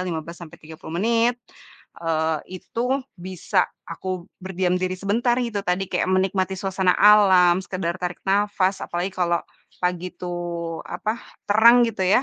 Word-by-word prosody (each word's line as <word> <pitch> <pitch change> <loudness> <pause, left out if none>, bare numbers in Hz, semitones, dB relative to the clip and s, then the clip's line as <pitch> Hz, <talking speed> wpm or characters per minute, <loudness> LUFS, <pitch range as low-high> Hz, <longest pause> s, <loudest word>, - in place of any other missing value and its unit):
15 170 -2 -4
sampai 160 - -11
30 160 +1 -8
menit. 230 +3 +2 0.6
Eee, 160 -1 0 0.2
itu 230 - -6 0.4
bisa 185 +1 0 0.2
aku 185 -2 -5 0.2
berdiam 185 -1 0
diri 185 0 -1
sebentar 230 +5 +1
gitu 230 -4 -2
tadi 180 +2 0
kayak - - +1
menikmati 190 0 +1
suasana 190 -1 +1
alam, 190 -4 +6
sekedar 175 -1 -3
tarik 180 -1 -4
nafas, 200 -1 +1
apalagi 175 +2 -2
kalau 175 -2 0 0.4
pagi 180 0 -1
itu 180 - -7 0.6
apa, 215 - -2 0.4
terang 235 +4 +7
gitu 210 -4 -4
ya. 195 +7 +4
185 Hz, 135 wpm, -23 LUFS, 175-205 Hz, 0.6 s, terang